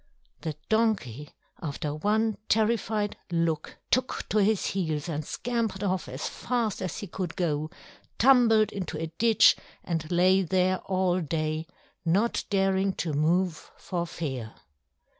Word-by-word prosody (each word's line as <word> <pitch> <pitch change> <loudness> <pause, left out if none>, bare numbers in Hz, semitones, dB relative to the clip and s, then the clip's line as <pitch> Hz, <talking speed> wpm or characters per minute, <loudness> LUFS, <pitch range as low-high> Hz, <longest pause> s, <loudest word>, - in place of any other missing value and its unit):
The 155 -2 -3
donkey, 200 - 0 0.3
after 150 -2 -3
one 215 +7 +1
terrified 215 -1 +1
look, 165 -2 -1
took 255 +1 0
to 215 - +2
his 210 0 +2
heels 160 -5 -1
and 155 -2 -2
scampered 225 +1 -2
off 185 -8 -1
as 130 +3 -4
fast 230 -6 -2
as 185 -2 -3
he 210 - -5
could 180 -2 -5
go, 155 -3 -1 0.5
tumbled 235 -4 +5
into 185 -5 -4
a 160 0 -4
ditch, 230 -2 +6 0.3
and 165 -2 -3
lay 185 +2 +4
there 185 +1 +1
all 185 -1 +1
day, 155 0 -2 0.4
not 195 +7 +1
daring 195 -1 +2
to 165 -4 -3
move 165 +3 +1
for 175 -2 -3
fear. 130 -10 -5
185 Hz, 135 wpm, -27 LUFS, 160-210 Hz, 0.5 s, ditch